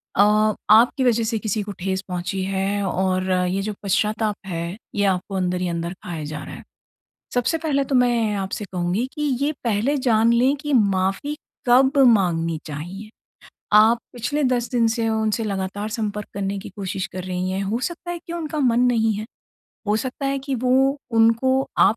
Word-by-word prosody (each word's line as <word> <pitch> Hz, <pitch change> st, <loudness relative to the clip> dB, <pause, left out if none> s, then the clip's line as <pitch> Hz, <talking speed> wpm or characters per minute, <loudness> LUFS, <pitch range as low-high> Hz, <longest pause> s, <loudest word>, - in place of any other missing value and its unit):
अ, 210 Hz, +1 st, +4 dB
आपकी 235 Hz, +5 st, +5 dB
वजह 235 Hz, -2 st, +3 dB
से 225 Hz, 0 st, -1 dB
किसी 215 Hz, 0 st, -1 dB
को 205 Hz, -, -6 dB
ठेस 190 Hz, +1 st, -1 dB
पहुँची 180 Hz, +1 st, -3 dB
है 195 Hz, +1 st, -1 dB
और 185 Hz, 0 st, 0 dB
ये 180 Hz, +1 st, +1 dB
जो 210 Hz, +1 st, -3 dB
पश्चाताप 210 Hz, +1 st, 0 dB
है, 170 Hz, 0 st, -4 dB, 0.2 s
ये 205 Hz, -1 st, +2 dB
आपको 190 Hz, +1 st, -1 dB
अंदर 180 Hz, -1 st, -1 dB
ही 180 Hz, -, 0 dB
अंदर 170 Hz, +1 st, -3 dB
खाए 165 Hz, -4 st, -5 dB
जा 150 Hz, +1 st, -6 dB
रहा -, -, -8 dB
हैं। -, -, -11 dB, 0.7 s
सबसे 245 Hz, +6 st, +1 dB
पहले 295 Hz, -4 st, 0 dB
तो 270 Hz, 0 st, -1 dB
मैं 240 Hz, -4 st, +2 dB
आपसे 195 Hz, +2 st, -4 dB
कहूँगी 180 Hz, +6 st, -1 dB
कि 300 Hz, -, -6 dB, 0.2 s
ये 290 Hz, -, +2 dB
पहले 230 Hz, +5 st, +1 dB
जान 230 Hz, -3 st, +3 dB
लें 255 Hz, +4 st, +3 dB
कि 295 Hz, 0 st, -3 dB
माफ़ी 200 Hz, +5 st, +1 dB, 0.3 s
कब 265 Hz, +3 st, +5 dB
माँगनी 170 Hz, -7 st, +2 dB
चाहिए। 175 Hz, +8 st, -7 dB, 0.7 s
आप 225 Hz, +2 st, +6 dB, 0.2 s
पिछले 265 Hz, +5 st, -1 dB
10 245 Hz, -2 st, +1 dB
दिन 235 Hz, -2 st, +3 dB
से 225 Hz, 0 st, 0 dB
उनसे 220 Hz, 0 st, 0 dB
लगातार 200 Hz, +1 st, -3 dB
संपर्क 210 Hz, -2 st, -3 dB
करने 200 Hz, 0 st, -2 dB
की 210 Hz, -, -9 dB
कोशिश 190 Hz, -2 st, -3 dB
कर 185 Hz, -1 st, -5 dB
रही 185 Hz, 0 st, -2 dB
हैं, 190 Hz, +1 st, -2 dB
हो 215 Hz, +5 st, -1 dB
सकता 345 Hz, +4 st, -4 dB
है 345 Hz, -, -5 dB
कि 340 Hz, -, -5 dB
उनका 310 Hz, -3 st, -3 dB
मन 245 Hz, -3 st, +3 dB
नहीं 225 Hz, -2 st, +2 dB
है, 210 Hz, +1 st, -4 dB, 0.6 s
हो 210 Hz, -, +2 dB
सकता 260 Hz, +4 st, -3 dB
है 275 Hz, 0 st, 0 dB
कि 270 Hz, 0 st, -3 dB
वो 260 Hz, +3 st, +2 dB
उनको 230 Hz, +4 st, +3 dB
आप 220 Hz, -, +5 dB
215 Hz, 185 wpm, -22 LUFS, 190-245 Hz, 0.7 s, आप